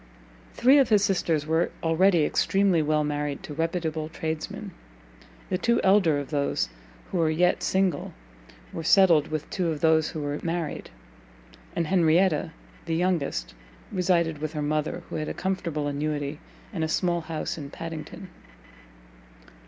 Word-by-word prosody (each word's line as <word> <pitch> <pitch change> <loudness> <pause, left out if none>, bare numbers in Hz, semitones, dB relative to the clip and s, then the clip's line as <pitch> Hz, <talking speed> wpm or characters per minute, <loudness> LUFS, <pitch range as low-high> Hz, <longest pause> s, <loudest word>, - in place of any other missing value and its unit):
Three 265 +4 +6
of 270 - +3
his 210 -2 +4
sisters 170 -6 +1
were 160 +2 +1
already 165 0 +4
extremely 195 -2 +2
well 150 0 +1
married 145 -1 -3
to 150 - -7
reputable 160 -1 -2
tradesmen; 160 -1 -5 0.8
the 185 - 0
two 235 0 +2
elder 190 -6 +4
of 145 0 -5
those 140 - 0 0.4
who 180 - -1
were 160 -1 +3
yet 175 +3 +2
single 190 -5 0 0.6
were - - -4
settled 170 -4 +5
with 155 -1 -4
two 180 -2 -1
of 155 -3 -2
those 160 -1 +3
who 155 - -5
were 145 0 -3
married, 170 -1 -3 0.9
and 170 - 0
Henrietta, 170 -1 +3 0.4
the 165 - 0
youngest, 155 - -1 0.4
resided 170 -4 +1
with 155 +1 -4
her 150 -1 -2
mother, 155 +1 -1
who - - -2
had 155 - -3
a - - -5
comfortable 170 -5 -2
annuity, 145 0 -2 0.3
and 165 -5 -2
a - - +1
small 175 +1 0
house 160 -1 -4
at 140 -1 -8
Padington. 165 +4 -7
160 Hz, 150 wpm, -26 LUFS, 150-180 Hz, 0.9 s, Three